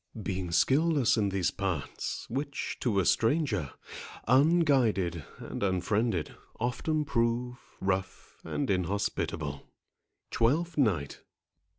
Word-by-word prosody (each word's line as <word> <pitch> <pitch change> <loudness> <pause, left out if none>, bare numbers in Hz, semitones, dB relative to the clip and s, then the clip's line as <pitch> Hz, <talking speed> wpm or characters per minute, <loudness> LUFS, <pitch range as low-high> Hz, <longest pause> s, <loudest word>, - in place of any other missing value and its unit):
Being 95 -2 -3
skilless 140 - +3
in 105 -3 +1
these 95 -2 0
parts, 95 -7 -3
which, 140 +3 -3
to 110 -6 +1
a 95 - +1
stranger, 115 - +1 0.5
Unguided 130 - +3
and - - -7
unfriended, 100 0 0 0.3
often 150 +6 0
prove 125 -1 0 0.2
Rough 95 -1 -2
and 140 - -2
inhospitable. 85 -6 -1 0.7
TWELFTH 155 +9 +1
NIGHT. 85 - +1
110 Hz, 95 wpm, -30 LUFS, 95-135 Hz, 0.7 s, skilless